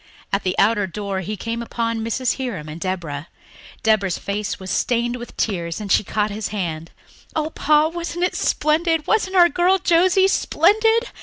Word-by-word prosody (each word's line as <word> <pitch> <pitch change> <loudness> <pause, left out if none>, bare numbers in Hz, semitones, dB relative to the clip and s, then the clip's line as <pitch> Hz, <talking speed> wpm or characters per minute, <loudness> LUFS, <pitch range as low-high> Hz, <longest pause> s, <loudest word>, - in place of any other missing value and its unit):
At 200 - +2
the 185 -1 -2
outer 205 -1 +3
door 200 +1 -4
he 205 +3 -4
came 230 +3 -4
upon 230 -1 -2
Mrs. 235 +2 -1
Hiram 235 - -4
and 155 +2 -8
Deborah. 170 -5 -4 0.6
Deborah's 205 -5 +2
face 200 +1 -3
was 190 0 -6
stained 240 0 0
with 240 0 -10
tears, 170 -5 -2
and 205 -2 -5
she - - +4
caught 210 +1 -1
at - - -5
his 215 -2 -3
hand. 165 -6 -4 0.5
"Oh, 310 0 -1
Pa, 300 0 +3
wasn't 345 +1 -2
it - - -2
splendid 315 +1 +1
wasn't 390 -3 +1
our 350 -2 +7
girl 360 +2 +2
Josie 370 +2 +4
splendid! 440 +7 +2
230 Hz, 175 wpm, -21 LUFS, -, 0.6 s, our